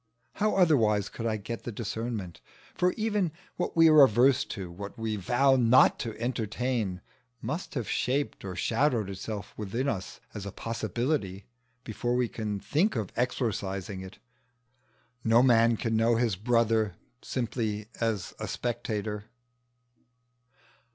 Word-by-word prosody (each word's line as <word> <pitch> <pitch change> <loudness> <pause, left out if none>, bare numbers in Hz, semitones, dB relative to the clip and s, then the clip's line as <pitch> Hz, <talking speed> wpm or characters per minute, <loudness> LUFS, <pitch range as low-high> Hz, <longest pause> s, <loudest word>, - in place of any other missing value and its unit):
How 215 +1 +1
otherwise 115 - +3
could 115 - -4
I 110 -1 0
get 115 +3 -6
the 120 - -4
discernment? 110 -4 -4 0.3
for 180 0 +2
even 210 -6 0 0.2
what 175 - -3
we 165 0 +8
are 155 -2 +8
averse 130 +1 +5
to, 95 -5 -6
what 100 +4 -8
we 110 -1 -2
vow 125 +8 +3
not 125 +1 +5
to 110 -2 -5
entertain, 115 -4 -2 0.4
must 155 +6 -4
have 125 -5 -2
shaped 140 +3 -1
or 95 -2 -5
shadowed 115 - +1
itself 100 +2 -6
within 110 +6 -2
us 100 -7 -3
as 105 - -6
a - - -5
possibility 115 -2 -2 0.4
before 120 +2 -2
we 125 -1 +2
can 105 -3 -4
think 170 - +1
of 110 -5 -2
exorcising 100 -6 -2
it. 95 +2 -10 1.1
No 115 +2 +5
man 115 -2 +5
can 115 0 -1
know 115 +1 +3
his 115 -4 +1
brother 110 -2 +2 0.3
simply 110 -4 -2 0.2
as 110 -4 -1
a 105 - -4
spectator. 110 -2 -3
115 Hz, 135 wpm, -28 LUFS, 105-125 Hz, 1.1 s, we